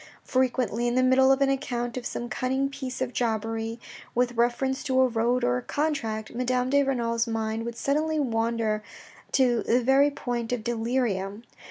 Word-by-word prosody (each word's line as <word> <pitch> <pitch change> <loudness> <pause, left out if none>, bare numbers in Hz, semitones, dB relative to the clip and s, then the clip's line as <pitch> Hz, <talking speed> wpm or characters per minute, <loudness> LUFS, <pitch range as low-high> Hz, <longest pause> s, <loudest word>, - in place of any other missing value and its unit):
Frequently, 250 -2 +1
in 240 - 0
the 255 - +3
middle 265 +1 +5
of 270 +1 +2
an 275 - +4
account 245 -3 -2
of 250 -1 -3
some 240 - -4
cunning 265 +3 -1
piece 265 -2 -6
of 255 -1 -5
jobbery, 225 0 -2 0.4
with 245 0 +2
reference 245 +3 0
to 260 -2 +2
a 260 - +6
road 240 +1 +1
or 125 0 +2
a - - -3
contract, 230 - -2
Madame 250 +1 0
de 285 0 +5
Renal's 235 -4 0
mind 225 0 -2
would 235 0 -5
suddenly 305 +5 0
wander 225 -4 0 0.5
to 245 -3 +3
the 245 +2 +2
very 270 +3 +5
point 245 -4 -4
of 245 -3 -2
delirium. 225 -3 -1
245 Hz, 175 wpm, -26 LUFS, 230-265 Hz, 0.5 s, a